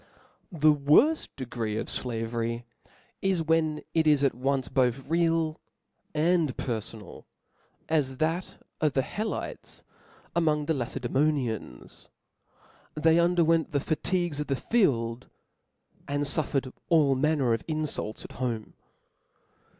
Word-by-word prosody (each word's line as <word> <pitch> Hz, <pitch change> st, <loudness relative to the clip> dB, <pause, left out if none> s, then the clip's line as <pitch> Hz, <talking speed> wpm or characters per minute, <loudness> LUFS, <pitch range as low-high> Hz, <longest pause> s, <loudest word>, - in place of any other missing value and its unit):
The 155 Hz, -3 st, +4 dB
worft 150 Hz, -, +4 dB
degree 115 Hz, -5 st, -3 dB
of -, -, -3 dB
flavery 115 Hz, 0 st, -2 dB, 0.6 s
is, 190 Hz, -4 st, +1 dB
when 160 Hz, -1 st, +1 dB
it 160 Hz, -1 st, +2 dB
is 145 Hz, -2 st, +4 dB
at 140 Hz, -, +3 dB
once 130 Hz, +1 st, -1 dB
both 130 Hz, 0 st, 0 dB
real 165 Hz, -1 st, +1 dB, 0.5 s
and 160 Hz, -3 st, +2 dB
perfonal, 110 Hz, -4 st, -5 dB, 0.6 s
as 140 Hz, -5 st, 0 dB
that 165 Hz, +5 st, -1 dB, 0.2 s
of 155 Hz, -3 st, +2 dB
the 135 Hz, -, +2 dB
He 210 Hz, -, -4 dB
lotes 220 Hz, -, -5 dB, 0.5 s
amdng 155 Hz, -3 st, +2 dB
the 160 Hz, -, +1 dB
Lacedaemonians. 130 Hz, -, -2 dB, 0.9 s
They 160 Hz, +2 st, +4 dB
under 175 Hz, 0 st, +3 dB
went 165 Hz, -1 st, +2 dB
the 140 Hz, -, +2 dB
fatigues 165 Hz, +1 st, -1 dB
of 150 Hz, -, -2 dB
the 135 Hz, -, +1 dB
field, 125 Hz, -, 0 dB, 0.8 s
and 145 Hz, +1 st, -1 dB
fufFered 140 Hz, -3 st, -1 dB, 0.2 s
all 150 Hz, -5 st, +5 dB
manner 135 Hz, -3 st, +2 dB
of 115 Hz, -, -2 dB
inlults 155 Hz, -8 st, -3 dB
iat -, -, -10 dB
home. 120 Hz, -4 st, -3 dB
145 Hz, 120 wpm, -28 LUFS, 125-160 Hz, 0.9 s, all